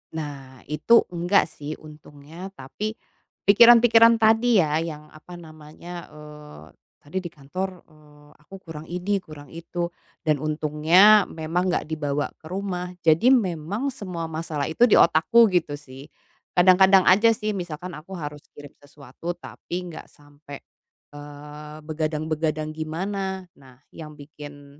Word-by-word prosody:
Nah 140 -4 -8
itu 230 +10 +4
nggak, 175 +3 +2
sih, 150 +1 -7
untungnya. 150 +3 -12
Tapi, 210 +11 -6 0.5
pikiran-pikiran 230 +1 +7
tadi, 225 0 +3
ya, 155 0 0
yang 150 -2 -7
apa 155 +3 -13
namanya, 165 +1 -11
eee, 150 - -13 0.4
tadi 150 +6 -7
di - - -4
kantor, 180 +5 -6
eee, 150 -1 -21
aku 150 +6 -14
kurang 160 -1 -9
ini 180 +3 -2
kurang 150 -5 -13
itu, 170 +1 -5 0.3
dan 155 -3 +1
untungnya 155 +7 +4
memang 165 +3 -2
nggak - - -1
dibawa 145 -2 -3
ke - - -21
rumah. 180 0 -4
Jadi 165 +8 +4
memang 205 - 0
semua 180 -9 -6
masalah 155 -3 -3
itu 240 +9 +4
di 220 - +4
otakku 195 +9 +5
gitu, 165 -5 0
sih. 135 -1 -13 0.5
Kadang-kadang 190 +1 +6
aja, 210 +5 +5
sih, 215 0 -3
misalkan 180 -2 -6
aku 165 +6 -10
harus 150 -2 -7
kirim 145 -1 -12
sesuatu 145 +4 -8
tapi 175 - -9 0.2
nggak 160 - -10
sampai, 145 -1 -14 0.5
eee, 150 +1 -11
begadang-begadang 155 0 -3
gimana. 190 +4 -4
Nah 130 -2 -18 0.2
yang 150 -2 -10
bikin 145 -1 -13
160 Hz, 135 wpm, -24 LUFS, 150-185 Hz, 0.5 s, pikiran-pikiran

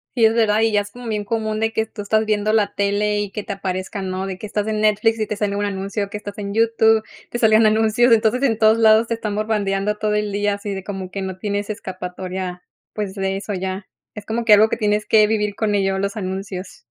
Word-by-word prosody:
Sí, 235 -3 +4
es 220 - +4
verdad, 220 -2 +2
y 225 0 +3
ya 205 -1 +3
es 205 - -9
como 245 +1 -10
bien 210 -2 -2
común 215 0 -2
de 225 0 0
que 220 0 0
tú 220 -1 -9
estás 215 +2 +1
viendo 215 0 +1
la 215 -2 +2
tele 205 +1 0
y 205 -1 -2
que 210 - -5
te 205 - -4
aparezcan, 190 0 -4
¿no?, 185 +1 -3
de 190 -1 -5
que 215 - -6
estás 205 0 -2
en 215 -1 -1
Netflix 215 +1 +2
y 215 - -1
te 210 - -3
sale 205 -1 -1
un 205 0 -1
anuncio, 200 +1 -3
que 210 - -5
estás 205 -1 -8
en 200 0 -5
YouTube, 225 -1 +3 0.3
te - - -3
sale 220 -2 +4
un 220 0 +6
anuncio, 220 +3 +3
entonces 230 +2 +3
en 240 -6 +2
todos 220 +1 +4
lados 220 0 +5
te 230 - -1
están 215 -2 -3
bombardeando 210 -1 0
todo 210 0 0
el 210 -1 -1
día 205 0 0
así 200 0 -5
de 190 -1 -5
como 190 -2 -6
que 195 - -4
no 190 -1 -5
tienes 205 +1 -3
escapatoria 185 -2 -5 0.3
pues 205 -3 -4
de 195 -1 -2
eso 200 +1 -5
ya, 190 +1 -4 0.3
es 210 -1 -8
como 230 +2 -2
que 225 -2 +6
algo 215 +2 +6
que - - -2
tienes 210 0 0
que 215 -1 +5
vivir 210 -1 0
con 210 0 0
ello, 195 -1 +1
los 200 +3 -2
anuncios. 190 -1 -5
210 Hz, 255 wpm, -21 LUFS, 200-220 Hz, 0.3 s, un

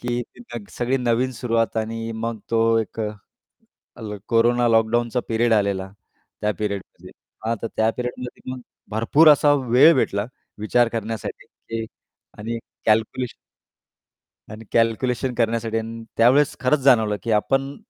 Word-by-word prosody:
की 120 0 -2 0.2
तिथं 120 -3 -9
सगळी 125 +2 +1
नवीन 125 +1 0
सुरुवात 115 -2 -1
आणि 115 +1 -3
मग 115 0 -4
तो 115 -1 +3 0.2
एक 110 +1 -4
अ, 110 - -1 0.9
ल 105 -2 -5
कोरोना 120 +1 +3
लॉकडाऊनचा 115 +1 +2
पिरियड 115 0 +2
आलेला 100 -2 0 0.5
त्या 105 - +1
पिरियडमध्ये 100 -2 -5 0.3
हां, 115 +1 0
तर 115 - -2
त्या 110 0 +3
पिरियडमध्ये 125 +1 -6
मग 130 - -7 0.3
भरपूर 115 +9 +4
असा 145 0 +5 0.2
वेळ 140 +7 +7
भेटला 100 -4 0 0.3
विचार 120 +3 +2
करण्यासाठी, 115 -1 -5
की 115 0 -7 0.5
आणि 115 +2 -4 0.3
कॅल्क्युलेशन 110 +3 +1 1.2
आणि 110 +1 -10
कॅल्क्युलेशन 120 +2 +1
करण्यासाठी 115 -1 0
आणि 115 +1 -5
त्यावेळेस 130 +5 +4
खरंच 130 +3 +2
जाणवलं, 110 -6 +4
की 115 - -2
आपण, 135 +6 +1
115 Hz, 135 wpm, -22 LUFS, 110-125 Hz, 1.2 s, वेळ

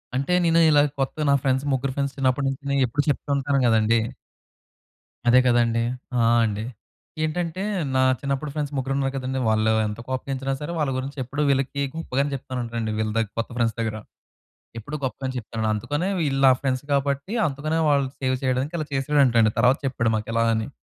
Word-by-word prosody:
అంటే 140 +7 0
నేను 165 0 +4
ఇలా 145 -1 +6 0.2
కొత్తగా, 145 +3 -1
నా - - +5
ఫ్రెండ్స్, 130 +1 +1
ముగ్గురు 130 0 -1
ఫ్రెండ్స్ 140 -1 -2
చిన్నప్పటి 135 +1 +1
నుంచి, 135 0 -5
నేను 140 0 +2
ఎప్పుడు 145 +5 -1
చెప్తూ 145 - -2
ఉంటాను 140 0 +1
కదండీ! 110 0 +3 1.3
అదే 125 +1 +7
కదండీ, 120 -1 +3 0.3
ఆ! 120 - +3 0.2
అండి. 105 0 -2 0.6
ఏంటంటే 165 +3 -2 0.3
నా 130 - +4 0.2
చిన్నప్పుడు 140 +1 -2
ఫ్రెండ్స్ 150 -1 -3
ముగ్గురు 135 0 -1
ఉన్నారు 135 -1 -1
కదండీ, 130 0 -2
వాళ్ళు 110 0 +2 0.2
ఎంత 105 +1 -6
కోపగించినా 135 +1 -2
సరే 150 +3 -4
వాళ్ళ 145 -3 0
గురించి 135 +3 -5
ఎప్పుడూ 135 +4 -4
వీళ్ళకి 140 +1 0
గొప్పగానే 145 -3 -1
చెప్తాను 130 -1 -5
ఉంటానండి 115 -2 -3
వీళ్ళ 110 0 0
దగ్ 110 -2 0
కొత్త 115 - -2
ఫ్రెండ్స్ 115 -3 +1
దగ్గర. 110 -1 -2 0.8
ఎప్పుడూ 145 +7 -6
గొప్పగానే 130 0 -3
చెప్తానండి. 110 -1 -3
అందుకనే 145 - -2
వీళ్ళు 140 -4 0
నా 130 - +8
ఫ్రెండ్స్ 130 -1 -1
కాబట్టి 140 +5 0
అందుకనే 155 +2 -2
వాళ్ళని 140 -2 +2
సేవ్ 130 0 +1
చేయడానికి 130 +4 -1
అలా 155 - -3
చేసాడంటండి. 135 -5 +3
తర్వాత 125 +3 +4
చెప్పాడు 115 -4 0
మాకు 110 0 -4
ఇలా 115 0 +2
అని, 110 0 -2
135 Hz, 175 wpm, -24 LUFS, 115-140 Hz, 1.3 s, నా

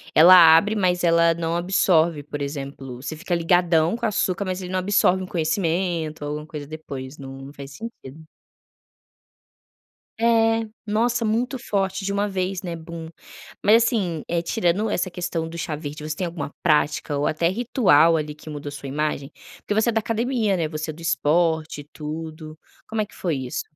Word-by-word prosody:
ela 170 +4 +9 0.2
abre 210 +6 +3
mas 180 -3 +1
ela 170 0 +4
não 165 0 -2
absorve, 170 -4 +2
por 145 0 -6
exemplo, 135 -2 -5
você 145 +3 -5
fica 175 +1 -2
"ligadão" 170 +1 +3
com 235 - -3
açúcar 200 -2 0
mas 185 0 -3
ele 180 0 -6
não 185 - 0
absorve 190 -1 +2
um 185 - -5
conhecimento 165 -1 -1
ou 145 - -3
alguma 150 +1 -5
coisa 150 -3 -7
depois, 140 -3 -8
não 135 0 -9
faz 140 -1 -10
sentido. 160 - -10 2.0
É, 225 -1 +3 0.2
nossa, 230 +2 +1
muito 245 +5 0
forte, 195 -4 -2
de 200 - -1
uma 205 +1 0
vez, 190 -1 -2
né, 175 -3 -5
"bum". 165 0 -8 0.6
Mas, 225 +3 +6
assim, 185 -10 -1
eh, 170 0 0
tirando 205 +3 0
essa 185 -2 -1
questão 175 -2 -3
do 170 - -8
"chá 160 -2 -3
verde", 150 0 -7
você 155 0 -3
tem 185 - -2
alguma 150 -4 -6
prática 150 -2 +1
ou 145 - 0
até 165 +2 +1
ritual 180 - +4
ali 150 -1 -4
que 155 - -12
mudou 145 -1 -6
sua 140 -1 -8
imagem? 150 0 -2 0.3
Porque 205 - -3
você 220 +2 +2
é - - +3
da 225 - +2
academia, 225 -2 0
né, 165 -2 0
você 155 0 -4
é - - -10
do 160 - -13
esporte 160 0 +1
e - - -12
tudo. 155 0 -7 0.3
Como 220 -1 -1
é - - -1
que - - -19
foi 170 -4 -1
isso? 130 -2 -4
170 Hz, 185 wpm, -23 LUFS, 155-195 Hz, 2.0 s, ela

